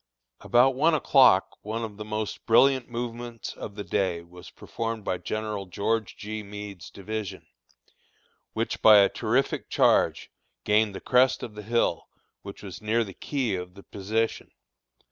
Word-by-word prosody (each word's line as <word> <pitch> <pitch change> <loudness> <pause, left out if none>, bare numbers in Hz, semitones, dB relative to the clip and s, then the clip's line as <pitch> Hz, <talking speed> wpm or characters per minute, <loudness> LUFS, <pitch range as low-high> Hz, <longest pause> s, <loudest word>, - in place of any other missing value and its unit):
About 125 +2 +4
one 155 +5 +3
o'clock, 125 -10 +4
one 110 +2 -4
of 105 -3 -7
the 105 - -6
most 105 0 -5
brilliant 130 +2 +4
movements 120 0 -5
of 100 - -8
the 105 - -5
day 90 -5 -1
was 90 +1 -13
performed 115 -2 -5
by 90 - -1
General 105 -3 -4
George 105 +3 -2
G. 110 +1 -5
Meade's 100 -2 -9
division, 100 -1 -6 1.1
which - - -3
by 110 -1 +8
a 100 -1 +6
terrific 125 +5 -1
charge, - - +2 0.3
gained 105 -1 +2
the - - -7
crest 130 +1 +3
of 115 - -6
the 105 - -8
hill, 110 -5 0 0.3
which 100 +1 -10
was 95 -3 -8
near 110 +2 +1
the 100 -3 -9
key 130 -3 -2
of 90 0 -5
the 100 - -13
position. 110 +3 -2
110 Hz, 155 wpm, -26 LUFS, 100-115 Hz, 1.1 s, by